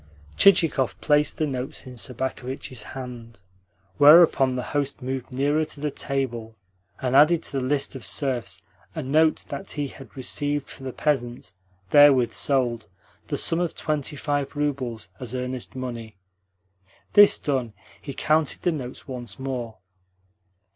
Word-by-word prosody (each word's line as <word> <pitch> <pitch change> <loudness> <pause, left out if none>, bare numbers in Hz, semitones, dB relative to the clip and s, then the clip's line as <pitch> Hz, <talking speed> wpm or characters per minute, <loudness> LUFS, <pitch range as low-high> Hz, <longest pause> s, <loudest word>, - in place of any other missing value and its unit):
Chichikov 165 - +4
placed 150 0 +2
the 155 - +1
notes 135 +1 -5
in 130 - -9
Sobakevitch's 130 +1 -3
hand; 120 -3 -9 0.6
whereupon 145 -4 +7
the 125 - -2
host 140 -2 -2
moved 130 0 -4
nearer 145 +4 +1
to 155 - -7
the 150 0 -2
table, 120 -6 -3 0.5
and 130 0 0
added 155 +4 +5
to - - -5
the 135 - -1
list 140 +2 0
of 135 -4 -8
serfs 100 - -3 0.3
a - - -3
note 155 +4 +2
that 140 - -6
he 145 -2 -3
had 130 -5 -14
received 145 +2 -2
for - - -11
the 130 -1 -5
peasants, 120 -6 -2 0.4
therewith 135 -5 +6
sold, 120 -5 0 0.4
the - - -2
sum 165 - +1
of 175 -2 -2
twenty 150 -1 -2
five 145 -1 -2
roubles, 130 -7 -2
as 125 0 -6
earnest 125 0 -5
money. 115 -5 -6 1.0
This 205 0 +7
done, 130 -6 -2 0.3
he 140 - -6
counted 155 -1 +1
the 175 - +2
notes 130 -6 -7
once 120 -6 -5
more. 125 -4 -5
135 Hz, 145 wpm, -24 LUFS, 125-145 Hz, 1.0 s, whereupon